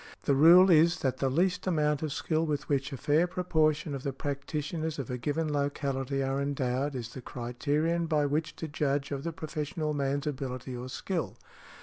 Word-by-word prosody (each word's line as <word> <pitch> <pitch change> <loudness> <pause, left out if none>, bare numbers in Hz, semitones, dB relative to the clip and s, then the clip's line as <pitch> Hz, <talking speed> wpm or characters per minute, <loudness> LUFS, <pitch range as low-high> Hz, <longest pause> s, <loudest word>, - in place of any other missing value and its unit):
The 140 - +2
rule 175 +7 +8
is, 165 +1 +5
that 130 -2 0
the 135 - +1
least 180 +6 +1
amount 150 -4 +1
of 155 -2 -2
skill 160 +2 0
with 150 -3 -2
which 140 0 0
a 135 - -5
fair 150 +5 +2
proportion 155 -4 +1
of 135 - -4
the 140 - -2
practitioners 150 +3 -3
of 135 -3 -4
a 125 - -2
given 150 +4 -1
locality 140 -1 -1
are 135 +1 -1
endowed, 140 0 -1
is 120 -2 -5
the 130 - -7
criterion 145 +8 -1
by 150 -2 +2
which 150 +3 -1
to 160 - -5
judge 145 -2 -1
of 140 -1 -3
the 170 - -2
professional 155 0 -3
man's 140 0 -1
ability 130 -3 -4
or 125 +1 -6
skill. 155 - -3
145 Hz, 190 wpm, -29 LUFS, 135-160 Hz, -, rule